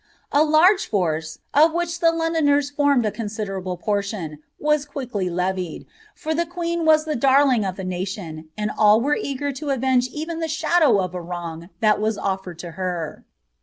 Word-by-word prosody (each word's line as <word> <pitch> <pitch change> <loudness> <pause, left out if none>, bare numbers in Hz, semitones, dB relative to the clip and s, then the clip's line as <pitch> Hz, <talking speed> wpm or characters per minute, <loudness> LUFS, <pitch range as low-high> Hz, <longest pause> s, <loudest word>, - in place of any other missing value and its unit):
"' - - -39
A 290 - +5
large 335 +6 +4
force, 160 -5 -1 0.2
of 315 +3 +5
which 345 0 -2
the 330 -1 +4
Londoners 315 -4 +1
formed 285 -4 +2
a 210 - 0
considerable 200 -5 -4
pottiuL 200 -6 -3 0.2
was 300 -1 +2
quickly 250 -10 -4
levied, 180 -1 -2 0.3
for 315 - -3
the 340 +1 0
queen 340 -1 -2
was 310 0 +5
Llic 305 -5 -2
darling 265 -3 +4
of 190 -2 -3
the 190 - -6
tiatioa, 180 -3 -5
aajafi 210 +1 +3
were 295 +2 +2
eager 285 -7 -3
in 285 +2 -5
avenge 260 -1 +2
even 320 +5 -5
the 325 - -1
shadow 310 -5 +3
of 185 -1 -2
a 180 - -4
wrong 170 -1 -6
that 215 -1 +3
was 215 0 0
otkni 190 -3 -4
M 170 - -8
her. 175 -4 -4
235 Hz, 175 wpm, -22 LUFS, 185-305 Hz, 0.3 s, A